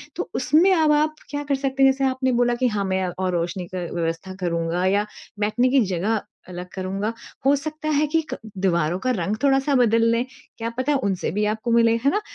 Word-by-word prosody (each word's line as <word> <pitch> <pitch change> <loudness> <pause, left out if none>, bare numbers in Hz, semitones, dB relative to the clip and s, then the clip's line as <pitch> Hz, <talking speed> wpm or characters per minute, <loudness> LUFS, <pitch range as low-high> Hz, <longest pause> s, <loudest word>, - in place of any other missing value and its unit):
तो - - -4
उसमें 340 +6 +4
अब 315 -3 +3
आप 305 +1 +2
क्या 290 0 -3
कर 285 -1 0
सकते 270 0 0
हैं, 270 - +7
जैसे 270 0 -1
आपने 260 0 0
बोला 240 0 +2
कि, 250 +1 +1
"हाँ 210 -4 -1
मैं 190 0 0
और 185 -1 0
रोशनी 175 +1 -2
का 185 - -2
व्यवस्था 165 +2 -3
करूँगा 170 0 -1
या 200 +2 +2 0.3
बैठने 215 +5 +2
की 270 0 +4
जगह 205 +5 0 0.3
अलग 180 0 -7
करूँगा।" 195 +3 -3 0.3
हो 280 +1 +5
सकता 310 +2 -4
है 305 - +2
कि 325 - +4
क - - -4 0.2
दीवारों 175 -2 +1
का - - +3
रंग 195 +5 -1
थोड़ा-सा 275 0 +3
बदल 230 -2 +4
लें। 230 +2 +1 0.3
क्या 230 0 -3
पता 285 +3 +1
उनसे 195 -3 -1
भी 210 - +2
आपको 230 +2 -4
मिले 230 0 +4
है 280 - +4
ना, 420 - 0
230 Hz, 215 wpm, -23 LUFS, 185-270 Hz, 0.3 s, हैं